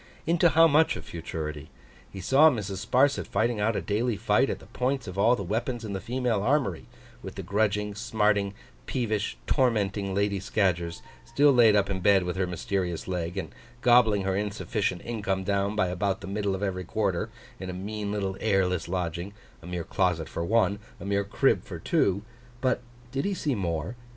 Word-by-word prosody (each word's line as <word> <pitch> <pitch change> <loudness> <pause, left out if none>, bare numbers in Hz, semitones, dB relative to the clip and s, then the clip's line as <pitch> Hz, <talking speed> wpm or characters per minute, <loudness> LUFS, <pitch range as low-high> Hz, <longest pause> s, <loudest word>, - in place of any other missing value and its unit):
Into 170 +1 +4
how 165 +1 +6
much 160 +1 +4
of - - -8
futurity? 80 -2 -6 0.4
He 95 - -7
saw 140 - +6
Mrs. 100 -8 -3
Sparsit 140 +3 +3
fighting 115 0 0
out 110 +2 +1
a - - 0
daily 110 +2 0
fight 115 +5 +2
at - - -2
the - - -15
points 130 0 -2
of 95 -2 -7
all 115 +5 +5
the 100 - -5
weapons 115 +5 -2
in 105 - -4
the 95 - -2
female 120 -1 -1
armoury, 120 - 0 0.3
with - - -8
the - - -5
grudging, 105 0 0
smarting, 105 -2 +1 0.3
peevish, 110 -5 -1
tormenting 100 -7 +1
Lady 100 0 +1
Scadgers, 85 -4 -1 0.2
still 140 +5 +4
laid 115 -5 +6
up 100 -1 +3
in 95 -1 -2
bed 95 0 +4
with 90 0 -3
her 95 -1 0
mysterious 90 -1 -2
leg, 90 0 -3
and 80 -6 -4 0.3
gobbling 120 -5 +5
her 95 0 0
insufficient 105 -2 -2
income 100 -5 -2
down 100 +1 0
by 95 -4 +1
about 95 +2 -1
the - - -7
middle 100 0 -1
of 95 - -5
every 95 -2 -2
quarter, 100 +2 -1 0.3
in 95 - -6
a - - -4
mean 100 +2 -4
little 100 -2 -2
airless 95 -5 +1
lodging, 90 +1 -3 0.3
a 85 - -11
mere 90 -1 -3
closet 90 -4 0
for 85 - -4
one, 105 +1 +2 0.2
a 90 - -8
mere 100 0 +1
crib 100 - +2
for - - -7
two; 100 +1 +1 0.4
but 130 -1 +1 0.3
did 135 +1 -1
he 200 -1 -1
see 150 -5 -1
more? 85 0 -2
100 Hz, 190 wpm, -27 LUFS, 95-115 Hz, 0.4 s, how